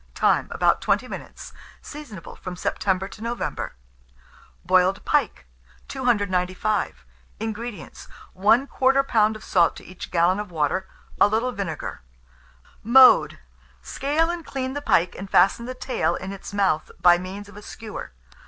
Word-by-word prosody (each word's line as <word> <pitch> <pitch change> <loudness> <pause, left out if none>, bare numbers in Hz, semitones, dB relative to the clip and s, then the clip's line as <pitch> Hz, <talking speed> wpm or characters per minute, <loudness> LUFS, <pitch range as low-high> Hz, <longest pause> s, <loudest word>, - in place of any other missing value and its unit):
Time. - - +2
About - - +2
20 - - +1
minutes. - - -9 0.3
Seasonable 275 - -10
from 185 -1 -7
September 190 +1 -1
to 210 - -13
November. 230 - -4 0.9
BOILED 185 +1 +2
PIKE. - - 0 0.4
295. 205 - -1 0.3
INGREDIENTS. 225 0 -6 0.3
1/4 220 +8 +3
lb. 260 -6 +2
of 215 - -10
salt 175 -3 +2
to - - -12
each 185 0 -9
gallon 175 +3 +2
of 210 -2 -5
water; 165 +3 -1 0.3
a - - +7
little 225 +4 0
vinegar. 195 -9 -5 0.8
Mode. 255 +3 +6 0.5
Scale 315 +4 0
and 345 -1 -5
clean 260 -3 -4
the 290 - -4
pike, 175 -10 +2
and 195 +1 -8
fasten 235 +6 +3
the 255 - -5
tail 255 +1 -1
in 190 +1 -6
its 195 - -9
mouth 195 -6 0
by 175 -1 +6
means 195 +3 -7
of 205 - -15
a 205 - -10
skewer. 215 +1 -8
205 Hz, 140 wpm, -24 LUFS, 185-245 Hz, 0.9 s, a